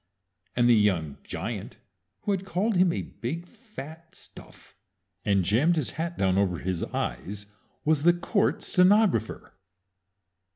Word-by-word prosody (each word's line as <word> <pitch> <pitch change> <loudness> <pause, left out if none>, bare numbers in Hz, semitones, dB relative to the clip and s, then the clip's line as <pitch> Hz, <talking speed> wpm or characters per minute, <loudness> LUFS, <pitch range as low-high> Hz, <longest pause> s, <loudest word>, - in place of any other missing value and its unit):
And 120 -1 +3
the 120 - +6
young 95 -9 +1
giant - - -5 0.4
who 205 - -1
had 195 -1 -1
called 195 +4 0
him 180 -1 +4
a - - -3
big, 135 +12 -5
fat 170 - -11
stuff, - - -15 0.5
and 100 -3 +2
jammed 140 - +3
his 155 -6 -1
hat 165 +1 -4
down 95 0 +2
over 95 -3 +1
his 90 0 -3
eyes, 100 +11 -4 0.3
was 155 -1 +3
the 175 +3 +6
court 195 +4 0
stenographer! 185 - +3
150 Hz, 135 wpm, -27 LUFS, -, 0.5 s, the